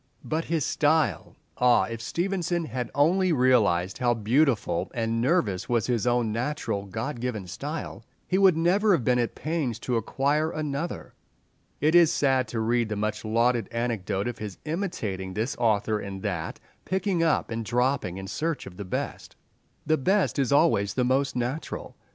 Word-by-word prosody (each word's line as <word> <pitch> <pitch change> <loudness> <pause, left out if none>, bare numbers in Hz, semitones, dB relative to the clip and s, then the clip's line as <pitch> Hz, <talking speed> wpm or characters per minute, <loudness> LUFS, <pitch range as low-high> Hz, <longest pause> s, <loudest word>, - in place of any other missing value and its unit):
But 160 +1 -2
his 160 -4 0
style! 155 0 +1 0.2
Ah, 125 -1 +5
if 115 -1 -5
Stevenson 175 +3 -1
had 125 -2 -4
only 180 +6 +3
realized 110 - +2
how 120 -1 +2
beautiful 115 - +1
and 115 0 0
nervous 120 - +1
was 120 -4 +1
his 120 -2 0
own 120 -2 +2
natural 115 -4 -2
God 115 +7 -4
given 115 -5 -3
style, 140 - -6 0.2
he 185 - +1
would 190 -4 +5
never 195 +5 +3
have 155 -9 +1
been 125 +1 +2
at 120 - -1
pains 155 -8 -2
to 125 -2 0
acquire 140 +7 0
another! 155 +1 -4 0.7
It 155 +3 +3
is 170 -2 +6
sad 130 -3 +2
to 115 +1 -3
read 115 0 +1
the 105 - -2
much 105 +1 -2
lauded 115 0 +1
anecdote 115 -4 -2
of 120 -1 -5
his 105 -3 -6
imitating 110 - -3
this 110 +5 -1
author 110 -2 +1
and 100 -1 -7
that, 90 -7 -3 0.2
picking 190 -2 0
up 165 -7 +1
and 115 0 -2
dropping, 120 -5 0
in 95 - -6
search 160 +9 -3
of 90 -2 -11
the 100 - -6
best. 90 - -5 0.5
The 155 +1 +2
best 190 +2 +1
is 135 -1 +1
always 120 -10 +3
the 125 - +1
most 135 +2 +1
natural. 125 +5 -4
125 Hz, 170 wpm, -26 LUFS, 110-155 Hz, 0.7 s, is